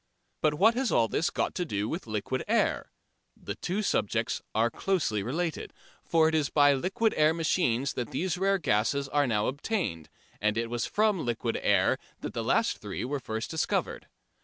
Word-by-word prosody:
But 155 -1 +2
what 215 +9 +5
has 255 0 0
all 115 -1 +3
this 165 - 0
got - - -1
to 180 - -1
do 105 -10 -2
with 160 0 -4
liquid 110 +4 -2
air? - - +1 0.5
The - - -5
two 195 +5 -3
subjects 105 - 0
are 115 +2 +2
closely 155 - 0
related, 160 - -3 0.3
for 160 -1 +3
it 160 - 0
is 155 -3 +1
by 145 -1 +5
liquid 195 - 0
air 155 +1 +4
machines 140 -6 +1
that 120 - -4
these 180 -1 -1
rare 195 +2 +2
gases 140 - +1
are 145 -1 +2
now 105 -3 +1
obtained, 140 - -2 0.3
and 105 +1 +1
it 115 0 -2
was 120 -1 -1
from 210 -4 +1
liquid 120 -2 -2
air - - +3 0.2
that - - -5
the - - -2
last - - +1
three - - -5
were 140 +2 -2
first 110 -2 -4
discovered. 160 - -1
145 Hz, 185 wpm, -28 LUFS, 115-180 Hz, 0.5 s, what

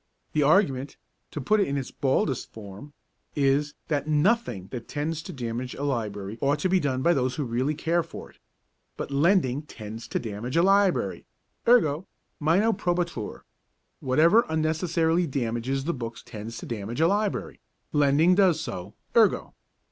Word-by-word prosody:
The 155 - +2
argument 140 -4 +2 0.3
to - - -6
put 210 +11 +2
it 200 - +2
in 140 - -1
its 135 -2 -4
baldest 135 -1 0
form 105 +6 -10 0.4
is, 145 +1 +1
that 150 -1 -1
Nothing 155 - +1
that 120 -2 -6
tends 155 +2 -3
to - - -8
damage 125 0 -4
a 140 - -5
library 110 -6 -3
ought 140 +1 +2
to 185 - +1
be 185 0 +4
done 130 -4 -1
by 170 - +5
those 130 -3 0
who 150 - -2
really 130 +4 -1
care 170 +3 +1
for 165 - -10
it; - - -28 0.6
but - - -5
lending 145 -2 +2
tends 110 -6 -9
to - - -2
damage 115 +5 -4
a 170 - +5
library, 195 0 +2 0.4
ergo. 185 -9 +4 0.3
Minor 185 +9 +3
probatur: 175 - -2 0.6
Whatever 165 - +4
unnecessarily 160 +2 +1
damages 130 0 -2
the 170 +4 -1
books 115 -4 -6
tends 115 +1 -7
to - - -7
damage 115 +2 -5
a 165 - +5
library; 205 +2 -1 0.3
lending 145 +4 +4
does 180 -4 +4
so, 95 - -6 0.2
ergo. 225 -3 +3
145 Hz, 160 wpm, -26 LUFS, 125-170 Hz, 0.6 s, by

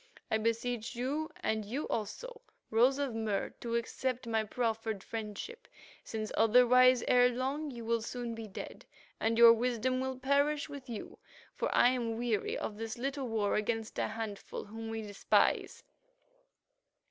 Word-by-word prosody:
I 220 - +3
beseech 230 +2 -1
you, 280 +6 -2
and 220 0 0
you 250 +9 -4
also, 470 - -4 0.3
Rose 245 +5 +4
of 280 -4 -1
Mur, 220 -3 -1
to 235 -1 -3
accept 255 +2 -2
my 225 -1 +1
proffered 220 -2 -2
friendship, 225 - -6 0.4
since 215 -1 -4
otherwise, 250 +2 +6
ere 245 0 +6
long, 270 +5 -2
you 235 -4 -7
will 230 0 +1
soon 240 +1 -4
be 225 -1 -7
dead, 195 - -8 0.4
and 225 +1 +1
your 235 0 +10
wisdom 250 +2 0
will 260 0 -2
perish 285 +3 +1
with 280 -4 -9
you 225 -3 -7 0.3
for - - -2
I 245 - +6
am 235 -3 -1
weary 230 -3 -1
of 210 - -4
this 225 +1 -5
little 270 +1 -2
war 220 -3 0
against 225 +1 -1
a - - +1
handful 220 -2 -6
whom 225 +2 -7
we 225 0 -4
despise. 205 -1 +1
235 Hz, 155 wpm, -32 LUFS, 220-255 Hz, 0.4 s, your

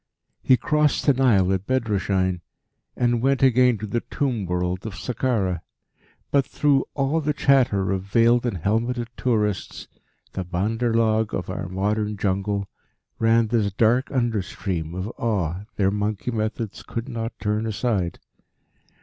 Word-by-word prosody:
He 130 - +5
crossed 150 +4 +1
the 140 - +5
Nile 105 -8 +3
at 95 +1 -3
Bedrashein, 95 -7 0 0.5
and 120 -1 +1
went 135 +1 +2
again 125 -2 +5
to 105 - -5
the 110 +3 -1
Tomb 120 -9 -2
World 90 +1 -1
of 110 -3 -6
Sakkara; 105 -8 -1 0.7
but 140 -1 +4
through 140 0 +1
all 145 +3 +1
the 150 -1 -1
chatter 120 -10 +3
of 95 -1 0
veiled 115 +5 +3
and 105 -6 -2
helmeted 115 +6 -1
tourists, 105 -6 -1 0.5
the 95 - -3
bandar 105 +7 -1
log 110 -1 +2
of 90 - -4
our 90 0 -4
modern 105 +3 -1
Jungle, 100 0 -1 0.5
ran 115 0 +3
this 105 -3 +1
dark 115 +6 +2
under 120 -6 0
stream 85 -2 -4
of 95 +2 -3
awe 95 -4 -1
their 95 -1 +2
monkey 105 +3 -2
methods 110 -1 -3
could 115 0 -5
not 115 0 -5
turn 105 +1 -1
aside. 105 -6 -1
110 Hz, 145 wpm, -23 LUFS, 95-120 Hz, 0.7 s, He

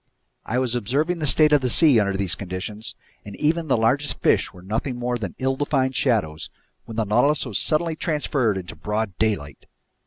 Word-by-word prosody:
I 125 - -1
was 125 -2 0
observing 140 - -1
the 150 - -1
state 150 +3 +5
of 145 - +5
the 125 - 0
sea 140 -2 +5
under 100 -2 0
these 95 -3 -1
conditions, 100 +3 -6 0.3
and 100 -1 -9
even 160 +2 0
the 130 - +2
largest 130 +7 +1
fish - - +2
were 90 - -15
nothing 110 +6 -3
more 125 0 -2
than 100 -6 -5
ill 130 0 0
defined 135 -2 0
shadows, 105 - 0 0.4
when 115 - -9
the 115 - +2
Nautilus 140 +9 +2
was 115 -6 -1
suddenly 160 +1 +1
transferred 140 - 0
into 90 -2 -7
broad 105 +4 -3
daylight. 100 -11 -2
120 Hz, 190 wpm, -23 LUFS, 100-145 Hz, 0.4 s, state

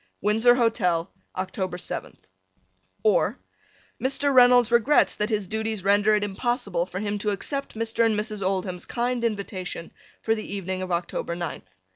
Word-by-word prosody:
Windsor 225 +4 +4
Hotel 190 -8 +1 0.3
October 185 -1 -3
7th - - -5 0.9
or 435 - +3 0.6
Mr. 275 +2 +2
Reynolds 245 -2 +6
regrets 240 +5 +4
that 210 +1 -1
his 210 -3 0
duties 220 0 -3
render 205 +2 +4
it 210 - 0
impossible 200 -4 -1
for 185 - -7
him 205 0 -2
to 210 - -1
accept 275 +8 -3
Mr. 230 +1 0
and 220 -2 +2
Mrs. 210 -1 -4
Oldham's 185 -1 -2
kind 245 0 -1
invitation 200 -6 -3 0.3
for 225 - +1
the 215 -2 -5
evening 185 -1 -3
of 185 -1 -4
October 170 0 -2
ninth. 160 - -6
210 Hz, 150 wpm, -25 LUFS, 185-235 Hz, 0.9 s, Reynolds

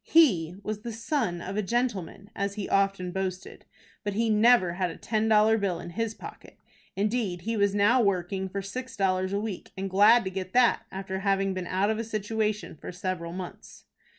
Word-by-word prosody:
He 185 - +4
was 210 0 -4
the 235 +1 -5
"son 225 - -2
of 190 +4 -5
a - - +2
gentleman," 210 -3 -2
as 200 0 -2
he 205 -2 -4
often 195 -2 +1
boasted, 190 0 -5 0.4
but 205 -2 -2
he 225 +1 +1
never 215 -4 +5
had 180 0 -1
a 165 - -8
ten 220 0 -1
dollar 220 0 +5
bill 185 -4 -1
in 175 - -8
his 225 +3 -2
pocket. - - -11 0.4
Indeed, 205 -3 -1
he 225 +4 -2
was 200 -1 +2
now 210 +5 +4
working 190 -1 0
for 200 +1 -4
six 250 +4 -6
dollars 185 -1 +1
a 200 - 0
week, 210 -3 -5
and 195 0 -3
glad 210 +5 +6
to 190 - -4
get 185 -1 -5
that, 240 -2 +3
after 190 0 -4
having 195 -1 +1
been 185 -2 -4
out 195 +3 +1
of 220 - -2
a - - -1
situation 215 -2 -2
for - - -7
several 180 -2 -4
months. 180 0 -9
200 Hz, 200 wpm, -27 LUFS, 185-220 Hz, 0.4 s, glad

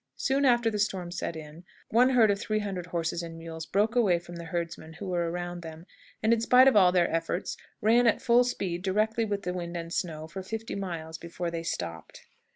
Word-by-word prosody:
Soon 275 +1 +1
after 240 -3 +4
the 210 - -2
storm 185 -4 -1
set 170 - -4
in, 155 +2 -10 0.3
one 245 +3 +5
herd 235 -5 +5
of 200 - -1
three 215 +1 -1
hundred 195 -4 -3
horses 170 -1 -2
and 165 -1 -7
mules 165 -1 -7
broke 210 +4 +1
away 205 -8 +4
from 175 0 -9
the 170 - -7
herdsmen 170 -1 -4
who 175 +5 -8
were 175 -2 0
around 175 0 -4
them, 160 0 -9 0.4
and, 220 +1 +4
in 230 - +1
spite 250 +3 +6
of 270 - +5
all 185 -3 +6
their 175 -2 +3
efforts, 165 +2 -2 0.3
ran 235 +3 +4
at 225 - +3
full 240 +1 +4
speed, 185 -8 -2
directly 215 +4 +1
with 205 -2 -3
the 180 - -2
wind 175 -1 -4
and 165 0 -6
snow, 155 -3 -3
for 190 +4 -7
fifty 225 +4 -5
miles 165 -4 -5
before 170 0 -4
they 165 -1 -3
stopped. 85 - -5
180 Hz, 220 wpm, -28 LUFS, 170-215 Hz, 0.4 s, spite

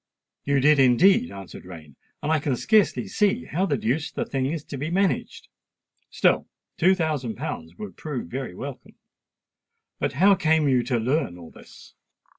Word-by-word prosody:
"You 140 -1 +2
did 150 +2 +4
indeed," 130 - +5
answered 100 -1 -10
Rain; 80 -6 -12 0.3
"and 150 - 0
I 160 - +3
can 140 -2 -1
scarcely 215 - +2
see 210 +4 0
how 185 +5 -1
the 145 -5 0
deuce 135 +7 -1
the - - -3
thing 130 -1 -2
is 155 +1 -3
to 140 - -7
be 150 +3 -3
managed. 190 +1 -1 0.6
Still - - +2 0.3
two 185 +3 +4
thousand 150 - -2
pounds 80 -2 -6
would 95 -1 -9
prove 145 - -5
very 130 -3 -5
welcome. 135 +4 -9 1.0
But - - -1
how 190 +8 +5
came 160 -4 +2
you 130 -2 +3
to 125 -1 0
learn 120 - -1
all 85 -2 -12
this?" - - -16
140 Hz, 170 wpm, -24 LUFS, 120-160 Hz, 1.0 s, indeed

